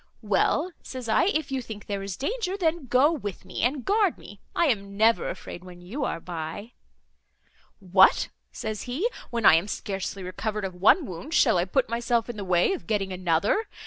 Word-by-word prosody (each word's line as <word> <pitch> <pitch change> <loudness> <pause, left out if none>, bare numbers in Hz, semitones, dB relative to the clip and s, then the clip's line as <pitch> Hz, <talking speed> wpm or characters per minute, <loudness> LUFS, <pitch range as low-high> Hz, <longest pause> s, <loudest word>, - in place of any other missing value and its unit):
'Well,' 365 - +1
says 255 -2 -7
I, 220 +7 +3
'if 315 -7 0
you 265 -1 -1
think 220 -3 -9
there 200 -1 -3
is 195 -2 -5
danger, 395 - -2
then, 330 -6 0
go 260 +6 +4
with 205 - -5
me, 185 - -5
and 255 +2 0
guard 405 -3 +2
me; 205 - -13
I 340 - +3
am 200 -7 -1
never 225 +2 +3
afraid 175 - -8
when 180 -1 -12
you 210 +12 -5
are 165 - -2
by.' 170 +6 -6 1.1
'What!' 190 0 +4 0.2
says 220 +1 -5
he, 305 - 0 0.2
'when 235 -3 -2
I - - +9
am 165 +5 +3
scarcely 195 -1 -4
recovered 210 +3 -3
of 190 - -4
one 205 - +4
wound, 250 - -6
shall 225 -11 +4
I 175 - +1
put 250 +8 +1
myself 235 0 0
in 225 - -12
the 205 - -4
way 180 - +2
of 375 - -7
getting 200 -4 -1
another? 185 - +1
220 Hz, 195 wpm, -26 LUFS, 190-270 Hz, 1.1 s, I